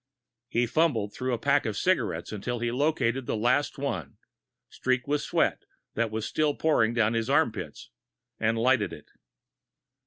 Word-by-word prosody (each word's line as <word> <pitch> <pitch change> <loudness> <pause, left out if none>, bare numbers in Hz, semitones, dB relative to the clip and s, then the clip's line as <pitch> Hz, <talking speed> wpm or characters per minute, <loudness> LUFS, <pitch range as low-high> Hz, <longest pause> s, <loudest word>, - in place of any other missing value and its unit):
He 120 0 +1
fumbled 120 -7 +1
through 130 0 -3
a 120 - 0
pack 140 +5 +2
of 105 -2 -3
cigarettes 110 - 0
until 110 +4 -3
he 120 0 -1
located 135 -2 0
the - - -1
last 125 +6 +1
one, 90 - -4 0.5
streaked 130 0 -1
with 145 0 +1
sweat - - 0 0.3
that 115 0 0
was 110 0 -3
still 150 -2 0
pouring 120 -8 +2
down 110 -2 +3
from 115 - 0
his 115 +2 -2
armpit, 120 - 0 0.6
and 110 +1 +1
lighted 115 -5 +2
it. - - -12
120 Hz, 160 wpm, -27 LUFS, 110-140 Hz, 0.6 s, down